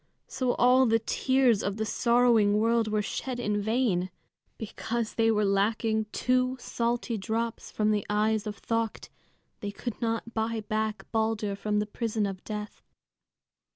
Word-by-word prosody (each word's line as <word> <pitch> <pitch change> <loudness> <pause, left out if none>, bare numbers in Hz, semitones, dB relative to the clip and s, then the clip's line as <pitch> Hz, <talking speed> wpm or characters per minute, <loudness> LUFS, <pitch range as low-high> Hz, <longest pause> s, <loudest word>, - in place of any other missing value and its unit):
So 255 -2 -1
all 255 +1 +5
the 225 0 +4
tears 250 0 +2
of 200 +1 -2
the 220 - -1
sorrowing 235 -3 +3
world 230 +1 +2
were 210 -1 0
shed 250 +4 -4
in 210 -3 0
vain. 215 -5 +1 0.5
Because 225 +1 -3
there 225 -1 +3
were 210 0 +2
lacking 220 +2 +1
two 255 +1 +1
salty 235 -1 -2
drops 225 +3 -3
from 215 0 +1
the 210 -2 +1
eyes 215 +1 +1
of 210 -1 -6
Thökt, 230 -1 -2 0.5
they 205 - -4
could 220 +4 -6
not 230 0 -2
buy 225 0 -1
back 215 0 -2
Balder 220 -2 0
from 210 +1 -1
the 210 - +1
prison 220 0 -2
of 195 -2 -5
death. 210 -1 -6
220 Hz, 155 wpm, -28 LUFS, 210-235 Hz, 0.5 s, all